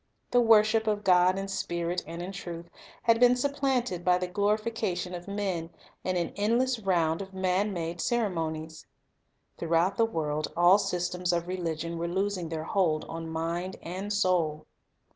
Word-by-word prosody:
The 245 Hz, -, +5 dB
wor 225 Hz, -2 st, +7 dB
ship 220 Hz, +1 st, 0 dB
of 210 Hz, -1 st, 0 dB
God 185 Hz, 0 st, +4 dB
"in 195 Hz, 0 st, -3 dB
Spirit 175 Hz, -2 st, -2 dB
and 170 Hz, +1 st, -6 dB
in 185 Hz, -, -5 dB
truth," 170 Hz, -2 st, -7 dB, 0.3 s
had 230 Hz, 0 st, +4 dB
been 245 Hz, 0 st, +6 dB
sup 280 Hz, +3 st, -1 dB
planted 250 Hz, -10 st, 0 dB
by 180 Hz, 0 st, +4 dB
the 180 Hz, -, -2 dB
glorification 205 Hz, -1 st, -1 dB
of 175 Hz, +1 st, -7 dB
men 195 Hz, -5 st, -2 dB, 0.3 s
in 185 Hz, -1 st, 0 dB
an 170 Hz, -1 st, -2 dB
endless 235 Hz, +4 st, +1 dB
round 170 Hz, -4 st, +1 dB
of 190 Hz, -1 st, -9 dB
man 190 Hz, +2 st, +1 dB
made 170 Hz, -2 st, -4 dB
ceremonies. 160 Hz, -8 st, -2 dB, 0.7 s
Throughout 170 Hz, +3 st, +1 dB
the 230 Hz, -, +4 dB
world, 155 Hz, -7 st, -2 dB
all 175 Hz, +3 st, +6 dB
systems 180 Hz, -1 st, -1 dB
of 170 Hz, 0 st, -1 dB
religion 170 Hz, -2 st, -3 dB
were 170 Hz, -, -1 dB
losing 190 Hz, -1 st, -1 dB
their 160 Hz, -1 st, -3 dB
hold 160 Hz, -4 st, +1 dB
on 165 Hz, 0 st, -6 dB
mind 170 Hz, +3 st, -3 dB
and 190 Hz, +4 st, -5 dB
soul. 180 Hz, -7 st, +1 dB
180 Hz, 165 wpm, -28 LUFS, 170-205 Hz, 0.7 s, wor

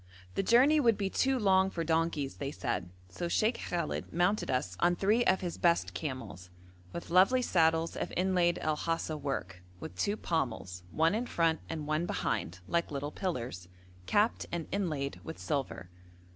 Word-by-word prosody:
The -, -, 0 dB
journey 255 Hz, +9 st, +5 dB
would 230 Hz, -6 st, +4 dB
be 195 Hz, -2 st, -1 dB
too 265 Hz, 0 st, +2 dB
long 190 Hz, -4 st, +4 dB
for 170 Hz, -3 st, -3 dB
donkeys, 160 Hz, -3 st, 0 dB
they 140 Hz, -, -3 dB
said, 120 Hz, -10 st, -3 dB, 0.2 s
so 175 Hz, -, -4 dB
Sheikh 220 Hz, +7 st, +1 dB
Khallet 170 Hz, -3 st, -3 dB
mounted 180 Hz, +5 st, +1 dB
us 125 Hz, -9 st, -1 dB
on 175 Hz, 0 st, +3 dB
three 210 Hz, +6 st, +3 dB
of 190 Hz, -3 st, +3 dB
his 175 Hz, -2 st, -4 dB
best 170 Hz, -1 st, +2 dB
camels, 130 Hz, -, -6 dB, 0.4 s
with 170 Hz, -, -7 dB
lovely 195 Hz, +9 st, +5 dB
saddles 165 Hz, -4 st, +2 dB
of -, -, -3 dB
inlaid 180 Hz, -2 st, +2 dB
El 155 Hz, -1 st, +1 dB
Hasa 165 Hz, 0 st, -1 dB
work, 140 Hz, -10 st, -4 dB, 0.2 s
with 90 Hz, -, -8 dB
two 205 Hz, -, 0 dB
pommels, 110 Hz, -, -2 dB
one 160 Hz, -, +2 dB
in 235 Hz, +3 st, -1 dB
front 165 Hz, -5 st, +1 dB
and 155 Hz, -2 st, -4 dB
one 155 Hz, +3 st, 0 dB
behind, 90 Hz, -, -2 dB
like 170 Hz, 0 st, 0 dB
little 145 Hz, 0 st, -4 dB
pillars, 120 Hz, -, -4 dB, 0.4 s
capped 210 Hz, -, +2 dB
and 170 Hz, -2 st, -2 dB
inlaid 155 Hz, -9 st, -2 dB
with 160 Hz, -, -7 dB
silver. 135 Hz, -, -3 dB
165 Hz, 170 wpm, -31 LUFS, 140-190 Hz, 0.4 s, journey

